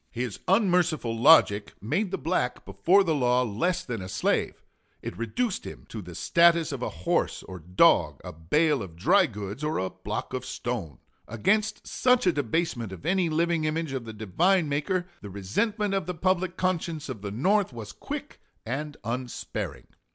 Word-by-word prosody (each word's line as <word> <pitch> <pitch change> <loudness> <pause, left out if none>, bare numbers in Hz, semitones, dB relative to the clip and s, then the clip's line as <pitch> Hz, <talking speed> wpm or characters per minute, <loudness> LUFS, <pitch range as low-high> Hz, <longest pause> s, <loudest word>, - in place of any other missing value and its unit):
His 120 -3 -4
unmerciful 180 - +2
logic 115 -6 +5
made 190 - -1
the - - -2
black 145 -4 -1
before 165 - +3
the 165 -4 +1
law 125 -3 +2
less 175 - -1
than 115 -5 -4
a 95 - -7
slave; - - -1 0.4
it - - -5
reduced 185 - -2
him - - -9
to 110 - -6
the 90 -2 -10
status 170 - +4
of 135 -3 -5
a - - -1 0.2
horse - - 0
or 90 -1 -9
dog, 90 +3 +3
a - - -7
bale 140 - +1
of 90 -5 -8
dry 180 - +4
goods 105 +4 -7
or 155 +1 0
a 95 0 -2
block 100 +3 -5
of 130 -1 -3
stone. 115 - -4 0.3
Against 210 - 0
such 250 -3 +2
a 180 - +4
debasement 140 - -1
of 95 +9 -10
any 180 0 +2
living 165 0 +1
image 155 -1 -1
of 130 -3 -4
the 110 - -6
Divine 160 - +2
Maker 165 +6 -1 0.2
the 100 - -8
resentment 200 - -1
of 195 -4 -1
the 180 - -3
public 185 +1 0
conscience 170 -4 -1
of 105 - -6
the 100 - -4
North 190 - +1
was 115 -4 -8
quick - - -7 0.2
and 145 +5 -4
unsparing. 120 +2 -4
145 Hz, 175 wpm, -27 LUFS, 110-180 Hz, 0.4 s, logic